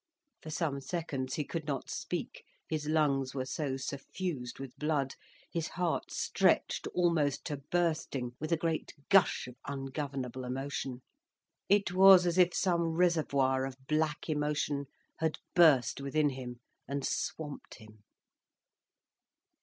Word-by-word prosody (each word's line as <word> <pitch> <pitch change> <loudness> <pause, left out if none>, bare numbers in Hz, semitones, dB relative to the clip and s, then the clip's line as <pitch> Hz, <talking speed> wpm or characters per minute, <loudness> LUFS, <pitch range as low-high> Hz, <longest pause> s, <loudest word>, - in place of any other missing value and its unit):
For 155 - -8
some 155 -3 -1
seconds 135 -4 -3
he 150 - -1
could 160 +1 -5
not 140 -3 -2
speak, - - -4 0.2
his 155 -2 -2
lungs 140 -4 +1
were 130 -1 -1
so 135 -1 -2
suffused 135 0 -4
with 135 -2 -8
blood, 150 -3 0 0.4
his 165 -2 -1
heart 175 -2 -1
stretched - - +1
almost 165 -6 +2
to 150 -3 -3
bursting 150 -4 -1
with 155 +3 -4
a 165 - +4
great 160 -1 -2
gush 195 -2 +5
of 125 0 -11
ungovernable 135 -2 -4
emotion. 130 0 -4 0.7
It 200 -3 +4
was 190 0 +8
as 175 +1 +1
if 180 -1 +6
some 170 -3 +1
reservoir 140 -7 +2
of 135 -1 -4
black 155 +1 0
emotion 150 -2 -1 0.3
had 160 -1 0 0.2
burst 140 -8 +5
within 145 +2 +2
him, 125 -2 -7 0.3
and 140 0 -2
swamped 150 -3 -4
him. 110 -1 -16
150 Hz, 130 wpm, -32 LUFS, 135-165 Hz, 0.7 s, was